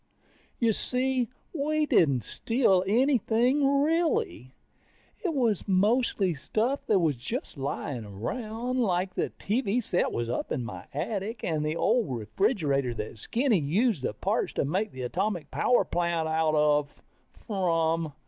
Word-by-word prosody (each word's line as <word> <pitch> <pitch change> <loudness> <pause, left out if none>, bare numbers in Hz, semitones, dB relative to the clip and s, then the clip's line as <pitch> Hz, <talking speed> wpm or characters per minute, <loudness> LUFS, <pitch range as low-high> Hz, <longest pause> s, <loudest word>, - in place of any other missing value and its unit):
You 230 -2 +2
see, 255 +1 +1 0.3
we 305 0 0
didn't 140 - +3
steal 225 - +2
anything, 260 +4 +3
really. 315 - 0 0.7
It 365 - 0
was 230 -8 +1
mostly 200 -1 +2
stuff 220 - -2
that 210 - +4
was 160 -6 +2
just 230 - -5
lying 135 -3 -4
around. 225 - -4
Like 185 -4 0
the - - -1
TV 220 +1 0
set 180 - 0
was 120 0 -2
up 120 - -3
in 125 - -2
my 95 -3 -8
attic, 195 - -3
and 155 -2 -1
the 155 +1 -1
old 215 - +1
refrigerator 140 - 0
that 110 0 -6
Skinny 235 - +1
used 180 - +1
the - - -3
parts - - -1
to - - 0
make 185 +8 -1
the 130 -1 -7
atomic 175 - -2
power 245 - +2
plant 170 -2 0
out 160 -1 +1
of 150 -1 +3 0.6
from. 165 - 0
190 Hz, 140 wpm, -28 LUFS, 150-240 Hz, 0.7 s, that